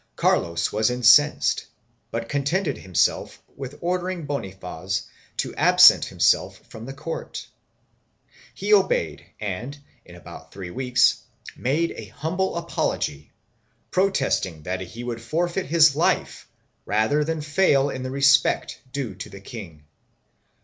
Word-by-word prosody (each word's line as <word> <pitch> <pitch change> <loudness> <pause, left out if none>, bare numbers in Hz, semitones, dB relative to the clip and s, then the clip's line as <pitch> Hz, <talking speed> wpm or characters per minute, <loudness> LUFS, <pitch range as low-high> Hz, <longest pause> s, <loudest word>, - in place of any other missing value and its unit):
Carlos 85 0 +1
was 110 +3 +1
incensed 125 +4 +4 0.4
but 115 0 -4
contented 145 +4 -1
himself 95 -3 0 0.2
with 135 +1 -8
ordering 180 -1 -2
Bonifaz 95 - -4 0.3
to - - -2
absent - - +6
himself - - +1
from 110 +2 -10
the 135 - -6
court; 155 +4 -6 1.1
he 425 - 0
obeyed - - +2 0.2
and, 110 +7 -5 0.3
in 90 - -14
about 85 -2 -12
three 95 -3 -8
weeks, 125 +3 +2 0.3
made 155 +6 0
an - - -9
humble 180 +6 -2
apology, 75 - -3 0.6
protesting 135 - 0
that 90 +3 -3
he 105 +6 -8
would 120 -2 -5
forfeit 175 +9 -2
his 155 -2 +5
life 155 - 0 0.3
rather 110 +9 +1
than 160 +1 -2
fail 145 -2 +2
in 130 - -5
the 130 - -4
respect 140 +1 +2
due 135 -7 -4
to 95 - -9
the 100 - -11
king. 95 -8 -10
135 Hz, 125 wpm, -24 LUFS, 100-155 Hz, 1.1 s, absent